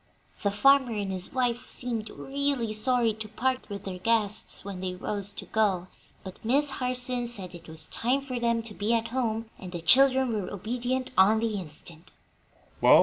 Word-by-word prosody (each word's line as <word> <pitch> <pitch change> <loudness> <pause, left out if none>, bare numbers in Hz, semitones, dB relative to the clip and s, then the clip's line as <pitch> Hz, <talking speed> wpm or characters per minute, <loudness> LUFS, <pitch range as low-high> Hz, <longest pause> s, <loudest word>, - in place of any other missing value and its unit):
The 200 - +2
farmer 265 +4 +4
and 200 -2 -2
his 185 -1 -5
wife 245 -2 -1
seemed 230 -3 -3
really 275 -5 -1
sorry 230 +1 +2
to 220 0 -6
part 255 +4 -1
with 200 -1 -6
their 185 -2 -5
guests 215 -2 +1
when 195 -2 -5
they 185 0 -3
rose 200 +2 -2
to - - -6
go, 190 -5 +1 0.3
but 190 -1 -10
Miss 275 +5 +3
Harson 250 -1 -2
said 195 -7 -7
that 170 -2 -11
it - - -16
was 160 -1 -2
time 255 +4 0
for 255 -3 -4
them 235 -1 +1
to 225 -2 -5
be 210 +3 +1
at 230 0 -1
home, 225 -2 -2
and 185 - -8
the 175 - -4
children 260 +6 +5
were 205 -4 -3
obedient 245 +5 -2
on 205 +4 +6
the 225 -1 0
instant. 160 0 -9
225 Hz, 185 wpm, -28 LUFS, 200-250 Hz, 0.3 s, on